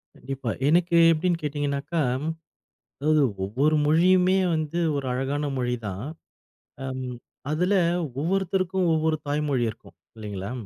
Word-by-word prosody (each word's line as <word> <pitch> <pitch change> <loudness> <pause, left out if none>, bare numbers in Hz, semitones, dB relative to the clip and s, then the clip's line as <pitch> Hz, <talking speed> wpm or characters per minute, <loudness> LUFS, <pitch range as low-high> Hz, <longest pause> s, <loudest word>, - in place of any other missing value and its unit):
கண்டிப்பா, 135 -2 -5 0.2
எனக்கு 170 +2 +3
எப்படின்னு 165 +1 0
கேட்டிங்கன்னாக்கா, 145 +2 -2 1.0
அதாவது 155 +1 +3 0.2
ஒவ்வொரு 135 +10 +1
மொழியுமே 180 +4 +4 0.2
வந்து 155 +1 -2 0.2
1 140 -2 -3
அழகான 140 +3 -1
மொழிதான். 120 -5 -3 1.5
அதில 180 +6 +1 0.5
ஒவ்வொருத்தருக்கும் 190 +2 0
ஒவ்வொரு 160 0 +1
தாய்மொழி 145 -3 0
இருக்கும். 110 - -18 0.2
இல்லைங்களா, 100 -1 -5
150 Hz, 95 wpm, -25 LUFS, 135-170 Hz, 1.5 s, மொழியுமே